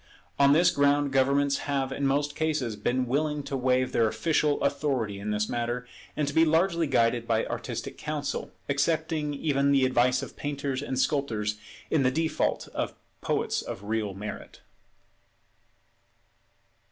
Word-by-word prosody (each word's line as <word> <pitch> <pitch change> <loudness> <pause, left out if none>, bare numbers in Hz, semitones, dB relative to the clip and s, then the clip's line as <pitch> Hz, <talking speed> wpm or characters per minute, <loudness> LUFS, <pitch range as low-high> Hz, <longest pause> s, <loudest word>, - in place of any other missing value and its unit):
On 140 0 +6
this 170 +4 +5
ground 145 0 +2
governments 140 +1 +2
have 135 -1 0
in 140 0 -1
most 145 +1 0
cases 150 -8 -1
been 125 +5 0
willing 150 +3 -1
to 140 - -4
waive 130 0 +1
their 115 - +3
official 150 +3 +1
authority 135 -8 0
in 105 +2 -4
this 105 0 0
matter, 120 +1 -2 0.3
and 150 - 0
to 145 - -2
be 160 - +5
largely 165 +1 +2
guided 115 -3 +2
by 115 -1 +1
artistic - - -5
counsel, 150 -2 -3 0.2
accepting 155 +1 0
even 140 -1 +1
the 135 -2 +4
advice 125 0 +2
of - - -8
painters 140 -2 -3
and 135 -2 -3
sculptors 110 -7 0 0.3
in 155 - +3
the 130 - +4
default 160 +4 -1
of - - -3 0.3
poets - - 0
of 95 - -7
real 105 -2 -2
merit. 105 +2 -8
140 Hz, 150 wpm, -27 LUFS, 120-145 Hz, 0.3 s, On